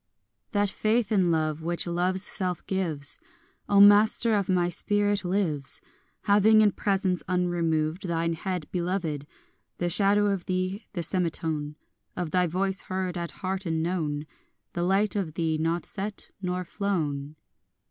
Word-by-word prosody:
4 205 - +1
That 205 - +2
faith 220 0 +1
in 190 -4 +3
love 155 -1 0
which 170 +1 -2
love's 180 +2 0
self 185 -4 -2
gives, 165 -7 -1 0.5
O 200 - +5
master 210 +3 +6
of 200 -2 +1
my 180 -2 +3
spirit, 205 +3 0
lives, 175 -7 -1 0.4
Having 215 +2 +5
in 210 -1 +5
presence 195 -3 0
unremoved 175 -1 0
Thine 165 0 0
head 180 0 -3
beloved, 170 -5 -2 0.5
The 175 0 -1
shadow 205 +3 +4
of 190 -3 -3
thee, 185 +3 -2
the 175 -4 -2
semitone 160 -4 -1 0.4
Of 175 -3 -3
thy 180 -1 +2
voice 190 +3 -1
heard 185 -1 -3
at 170 -1 -3 0.2
heart 190 0 -2
and 160 -1 0
known, 155 -4 -2 0.5
The 175 - -2
light 195 +4 +2
of 175 -6 -2
thee 160 -2 0
not 165 +2 0
set 205 +1 -6
nor 180 -1 -2
flown. 155 -8 -2
180 Hz, 145 wpm, -27 LUFS, 165-195 Hz, 0.5 s, master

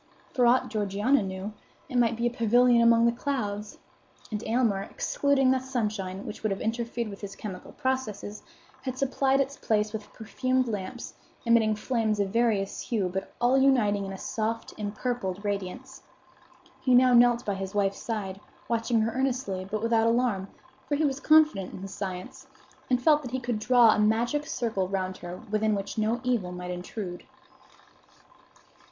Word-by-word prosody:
For 250 -3 +4
aught 250 +2 +3
Georgiana 210 +5 +1
knew, 190 +2 -5 0.3
it - - -8
might 235 -2 +3
be 235 - -1
a 240 - +2
pavilion 240 +1 +4
among 230 0 +5
the 235 - +4
clouds. 215 -5 -3 0.5
And 210 +1 -3
Aylmer, 225 -4 +2
excluding 270 +5 +1
the 260 - +2
sunshine, 210 -7 -3
which - - -7
would 215 - 0
have 195 - -2
interfered 235 +1 -2
with 200 -2 -9
his 200 -1 -7
chemical 190 -4 -8
processes, 215 -6 -3 0.4
had 260 -1 -4
supplied 270 0 +1
its 275 +1 -1
place 210 -1 0
with 215 -1 -6
perfumed 255 +3 -1
lamps, 210 +2 -5 0.3
emitting 225 -2 +4
flames 220 -1 0
of 200 -1 +1
various 225 -4 +1
hue, 205 -6 -1
but 190 - -4
all 245 +3 +4
uniting 225 -7 +3
in 195 - -5
a 195 - -6
soft, 225 +3 -3
impurpled 210 -2 -3
radiance. 205 +7 -4 0.8
He 255 -2 +3
now 250 0 +6
knelt 240 0 +5
by 205 - 0
his 195 +1 -5
wife's 195 -1 0
side, 200 -4 -4 0.3
watching 230 0 +1
her 225 +1 0
earnestly, 250 -7 -2
but 215 +1 -3
without 230 -1 +3
alarm; 230 -5 +1 0.4
for 290 - +2
he 305 +2 +1
was 275 -1 -1
confident 305 -12 +4
in - - -8
his 195 0 -7
science, 195 +8 -6 0.4
and 250 -1 +3
felt 300 +3 +4
that 255 - -6
he 260 +2 -2
could 240 -3 -2
draw 240 0 +6
a - - -1
magic 235 +8 +1
circle 225 -10 -1
round 185 -1 -2
her 175 +1 -7
within 215 0 +2
which 200 +2 -4
no 220 +3 +1
evil 235 -8 0
might 180 0 -6
intrude. 180 0 -6
225 Hz, 170 wpm, -27 LUFS, 200-250 Hz, 0.8 s, now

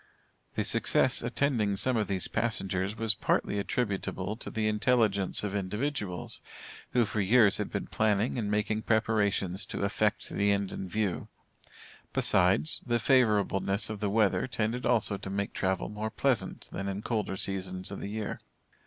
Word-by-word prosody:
The - - 0
success 130 +1 +3
attending 120 -4 0
some 130 +6 +1
of 110 -2 0
these 95 -3 +2
passengers 95 -3 -1
was 110 -1 +2
partly 100 0 0
attributable 100 -2 -2
to - - -7
the 110 -1 -1
intelligence 105 -3 +1
of 100 -2 -3
individuals, 100 - -3 0.5
who, 120 -2 +4
for 110 0 -2
years, 105 +1 +4
had - - -2
been - - -3
planning 110 +1 +1
and 105 -3 -2
making 105 +1 0
preparations 105 -4 +1
to - - -3
effect 105 +1 0
the 100 0 +1
end 100 -1 0
in 95 - -5
view. 105 -1 -2 0.9
Besides, 95 - +3
the 120 -1 0
favorableness 105 -5 +2
of 105 - -5
the 105 -1 -1
weather 105 +3 +2
tended 120 0 -2
also 110 -4 +2
to 95 - -7
make 100 +1 -2
travel 95 -1 -1
more 105 +1 -4
pleasant 130 +2 -1
than 100 - -4
in 100 +2 -4
colder 105 -4 -2
seasons 95 -1 -3
of 100 - -6
the 100 - -5
year. 105 0 -4
105 Hz, 160 wpm, -29 LUFS, 100-110 Hz, 0.9 s, who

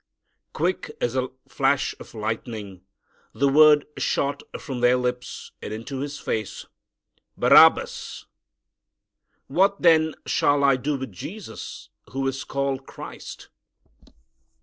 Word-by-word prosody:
Quick 180 +4 -1
as 120 +1 -1
a 130 -1 0 0.2
flash - - +1
of - - -12
lightning 110 -3 -5 0.5
the 140 - +2
word 150 +1 +6
shot 140 0 0 0.2
from 130 -3 -5
their 125 +1 +4
lips 125 0 -4
and - - -6
into 115 +5 -5
his 145 +1 -4
face, 110 -2 -4 0.7
"Barabbas!" - - +5 1.2
"What, 195 +8 +1
then, 160 -2 +5
shall 145 0 +2
I 140 -1 +5
do 140 +2 -1
with 130 -4 -6
Jesus, 130 - -8 0.2
who 135 0 -1
is 135 0 -3
called 140 -1 -2
Christ?" - - -10
135 Hz, 115 wpm, -24 LUFS, 120-145 Hz, 1.2 s, word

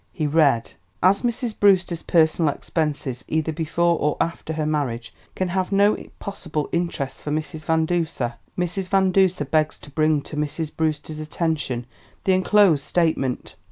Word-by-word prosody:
He 155 - -2
read: 145 -6 +3 0.3
"As 190 +2 +4
Mrs. 240 -1 -2
Brewster's 185 -4 +3
personal 160 -2 +3
expenses, 145 -6 -3
either 160 0 0
before 170 +2 +1
or 150 0 0
after 165 -1 -2
her 155 -1 -1
marriage, 125 -6 -2 0.2
can 185 -1 -1
have 185 +1 -1
no 200 +1 +4 0.2
possible 165 -7 -4
interest 170 -6 -2
for - - -5
Mrs. 155 +1 -3
Van 160 0 +2
Duser, 160 -8 -1 0.2
Mrs. 180 +1 -2
Van 190 -1 +3
Duser 185 -5 +3
begs 155 +2 +1
to 145 - -14
bring 155 -1 +2
to - - -8
Mrs. 150 +1 -3
Brewster's 155 -1 -2
attention 155 -6 -2 0.4
the 190 - +3
enclosed 185 -5 +4
statement. 155 -8 0
160 Hz, 155 wpm, -23 LUFS, 150-180 Hz, 0.4 s, As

